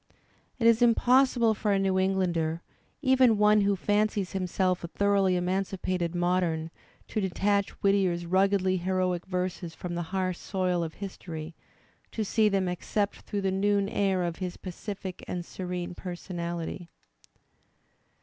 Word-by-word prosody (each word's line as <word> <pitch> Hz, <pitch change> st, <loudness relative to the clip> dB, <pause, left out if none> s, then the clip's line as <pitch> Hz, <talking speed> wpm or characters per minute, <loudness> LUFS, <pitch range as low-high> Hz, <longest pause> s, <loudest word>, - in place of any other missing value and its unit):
It 235 Hz, -, -1 dB
is 230 Hz, 0 st, +5 dB
impossible 240 Hz, 0 st, +4 dB
for 210 Hz, 0 st, -1 dB
a 200 Hz, -, +3 dB
New 190 Hz, -1 st, +1 dB
Englander 175 Hz, -4 st, 0 dB, 0.4 s
(even 260 Hz, -4 st, +5 dB
one 210 Hz, 0 st, +5 dB
who 200 Hz, 0 st, +2 dB
fancies 205 Hz, 0 st, 0 dB
himself 185 Hz, -1 st, 0 dB
a -, -, -3 dB
thoroughly 200 Hz, 0 st, +2 dB
emancipated 180 Hz, -1 st, -1 dB
modem) 175 Hz, -2 st, 0 dB, 0.4 s
to 215 Hz, -, -1 dB
detach 200 Hz, +1 st, +1 dB
Whit 200 Hz, -, +5 dB
tier's 180 Hz, -3 st, +1 dB
ruggedly 190 Hz, +1 st, +2 dB
heroic 185 Hz, 0 st, -1 dB
verses 180 Hz, -2 st, -3 dB
from 175 Hz, -1 st, -5 dB
the 175 Hz, -, -2 dB
harsh 185 Hz, -2 st, -1 dB
soil 180 Hz, -3 st, -1 dB
of 160 Hz, -1 st, -6 dB
history, 170 Hz, -5 st, -7 dB, 0.6 s
to 220 Hz, -, -1 dB
^ -, -, -4 dB
see 215 Hz, +1 st, +3 dB
them 195 Hz, -2 st, +1 dB
except 200 Hz, +3 st, -1 dB
through 205 Hz, -, -4 dB
the 190 Hz, -1 st, 0 dB
noon 200 Hz, +1 st, +2 dB
air 195 Hz, -2 st, +1 dB
of 170 Hz, -1 st, -3 dB
his 180 Hz, -1 st, -4 dB
pacific 190 Hz, 0 st, -7 dB
and 175 Hz, -1 st, -4 dB
serene 180 Hz, -1 st, -5 dB
personality. 175 Hz, -1 st, -5 dB
190 Hz, 145 wpm, -28 LUFS, 175-200 Hz, 0.6 s, is